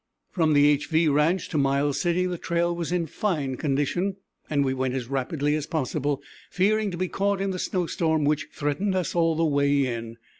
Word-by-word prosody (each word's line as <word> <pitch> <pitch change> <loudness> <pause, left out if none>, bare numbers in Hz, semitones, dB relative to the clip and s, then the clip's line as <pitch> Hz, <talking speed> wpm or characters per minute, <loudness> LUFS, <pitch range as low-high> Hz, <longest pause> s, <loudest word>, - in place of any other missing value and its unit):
From 160 -4 +2
the 145 0 +5
=HV= 160 -1 +1
ranch 160 +5 +2
to 155 - 0
Miles 140 +1 +1
City 175 +1 +1
the 180 -2 -3
trail 170 0 0
was 170 -1 -3
in 175 -2 0
fine 150 -6 -2
condition, 150 +8 -1 0.3
and 145 -2 +1
we 130 - 0
went 130 0 -1
in - - 0
as 120 - -8
rapidly 140 +3 -1
as 150 -1 -2
possible, 145 -1 -2 0.3
fearing 210 +3 +1
to 175 - -5
be 185 +1 -1
caught 200 +2 0
in 195 0 -1
the 185 - -4
snow 180 -1 -1
storm 160 -4 0
which 150 0 0
threatened 150 +7 -1
us 185 -2 -1
all 165 -1 +2
the 165 +1 +1
way 140 -2 +2
in. 115 -2 -5
155 Hz, 210 wpm, -25 LUFS, 140-175 Hz, 0.3 s, the